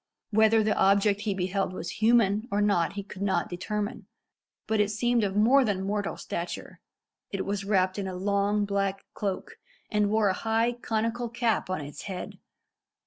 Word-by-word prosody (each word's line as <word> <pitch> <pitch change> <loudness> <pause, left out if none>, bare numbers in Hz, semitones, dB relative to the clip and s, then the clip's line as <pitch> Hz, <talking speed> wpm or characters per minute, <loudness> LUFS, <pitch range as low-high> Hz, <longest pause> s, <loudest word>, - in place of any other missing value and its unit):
Whether 220 +1 +5
the 215 - +1
object 200 +1 +3
he 210 -2 -1
beheld 190 0 -1
was 180 +3 -6
human 220 -1 +3
or 205 - 0
not 200 -5 +2
he 200 0 -5
could 195 -1 -10
not 200 -1 0
determine, 210 +5 -4 0.6
but 220 -1 0
it 210 -1 +3
seemed 235 +2 +1
of 195 -1 -1
more 245 +6 +5
than 200 -5 -1
mortal 205 +1 -2
stature. 170 +1 -5 0.5
It 195 - -3
was 200 0 -2
wrapped 190 -1 +1
in 195 - -3
a 185 - -5
long 200 +2 +1
black 195 -1 -1
cloak, 195 -3 -4 0.3
and 210 -1 +2
wore 215 -1 +3
a - - +2
high 225 +4 +1
conical 235 0 -2
cap 230 -4 0
on 185 -4 -2
its 145 0 -8
head. 190 -3 -6
205 Hz, 175 wpm, -28 LUFS, 195-220 Hz, 0.6 s, Whether